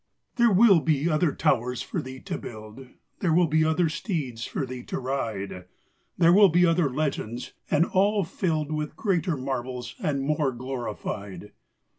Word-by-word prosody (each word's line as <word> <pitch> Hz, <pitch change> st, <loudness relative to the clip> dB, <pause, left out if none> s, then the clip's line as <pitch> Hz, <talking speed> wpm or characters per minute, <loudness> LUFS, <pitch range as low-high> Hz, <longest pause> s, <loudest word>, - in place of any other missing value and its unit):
There 235 Hz, -2 st, +5 dB
will 195 Hz, -2 st, +6 dB
be 155 Hz, -1 st, +1 dB
other 155 Hz, 0 st, +2 dB
towers 125 Hz, 0 st, 0 dB
for -, -, -3 dB
thee 130 Hz, 0 st, -8 dB
to -, -, -5 dB
build; 110 Hz, +3 st, -10 dB, 0.3 s
There 170 Hz, -4 st, +1 dB
will 175 Hz, 0 st, +5 dB
be 155 Hz, 0 st, +2 dB
other 160 Hz, +2 st, +2 dB
steeds 155 Hz, -, -3 dB
for 140 Hz, -, -3 dB
thee 125 Hz, -1 st, -7 dB
to -, -, -4 dB
ride; 110 Hz, -8 st, -4 dB, 0.5 s
There 170 Hz, 0 st, +5 dB
will 200 Hz, 0 st, +7 dB
be 175 Hz, +2 st, +4 dB
other 165 Hz, -3 st, +2 dB
legends, 130 Hz, -4 st, -3 dB, 0.2 s
and 160 Hz, +3 st, +3 dB
all 200 Hz, +2 st, +2 dB
filled 160 Hz, -3 st, -2 dB
With 150 Hz, -1 st, -3 dB
greater 180 Hz, -6 st, 0 dB
marvels 130 Hz, -2 st, -4 dB
and 145 Hz, -6 st, -1 dB
more 150 Hz, -2 st, 0 dB
glorified. 105 Hz, -6 st, -6 dB
150 Hz, 160 wpm, -26 LUFS, 125-170 Hz, 0.5 s, will